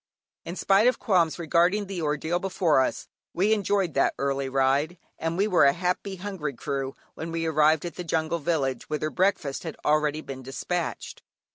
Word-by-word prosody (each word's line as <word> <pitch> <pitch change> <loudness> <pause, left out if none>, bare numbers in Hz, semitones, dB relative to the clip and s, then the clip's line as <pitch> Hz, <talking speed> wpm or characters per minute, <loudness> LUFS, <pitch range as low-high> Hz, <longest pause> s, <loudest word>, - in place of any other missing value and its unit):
In 170 - -5
spite 195 +4 +4
of 250 - +3
qualms 175 -6 +2
regarding 175 +5 +2
the 190 -3 -5
ordeal 160 +3 -1
before 180 -5 +2
us, 130 - -2 0.3
we 200 +5 +3
enjoyed 200 -4 0
that 135 - +2
early 140 -1 -1
ride, 135 +5 +1 0.2
and 165 +1 -2
were 195 -2 +3
a - - +7
very 170 - -12
happy, 180 +2 -1
hungry 185 -6 -4
crew 135 +1 -3 0.2
when 165 +1 -6
we 165 0 -2
arrived 155 0 +3
at 175 - -6
the 180 - -4
jungle 165 0 -1
village 140 -6 -1
whither 155 0 -2
breakfast 165 -4 0
had 160 -3 -6
already 150 0 +2
been 135 -3 -8
despatched. 165 +7 -4
165 Hz, 175 wpm, -26 LUFS, 150-180 Hz, 0.3 s, a